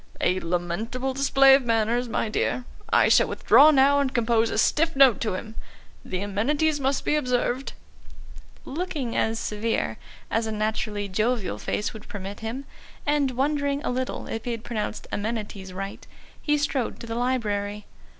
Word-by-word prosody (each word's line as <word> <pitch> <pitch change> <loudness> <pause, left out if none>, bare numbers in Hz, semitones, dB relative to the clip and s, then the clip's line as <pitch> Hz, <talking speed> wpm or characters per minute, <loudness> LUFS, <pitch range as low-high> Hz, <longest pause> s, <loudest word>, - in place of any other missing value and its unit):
"A 185 +1 +1
lamentable 185 +10 -2
display 275 0 +5
of 275 - +6
manners, 230 +1 +1
my 230 - -1
dear. 245 +3 -1 0.3
I - - +5
shall - - +5
withdraw 295 +2 +6
now 285 -1 +5
and 275 -2 0
compose 230 -2 +2
a - - -3
stiff 325 +1 +2
note 270 -5 +6
to 215 -5 -1
him. 220 +3 -7 0.5
The 185 0 -4
amenities 285 +10 0
must 275 0 0
be - - +2
observed." 250 -1 -1 0.9
Looking 295 -5 -3
as 225 0 +1
severe 225 +1 -2 0.3
as 225 0 0
a - - -3
naturally 215 -1 -2
jovial 215 +2 -1
face 210 - -2
would 215 - -11
permit 200 0 -7
him, 235 +5 -5 0.4
and 290 -2 +2
wondering 285 +2 0
a - - -1
little 255 +1 -3
if 225 0 -5
he - - -2
had 225 -1 -6
pronounced 215 -2 -4
"amenities" 205 -3 -4
right, 195 +2 -7 0.3
he 295 -1 +2
strode 280 -4 -1
to - - -8
the 230 - -5
library. 210 -4 -1
235 Hz, 160 wpm, -25 LUFS, 210-270 Hz, 0.9 s, of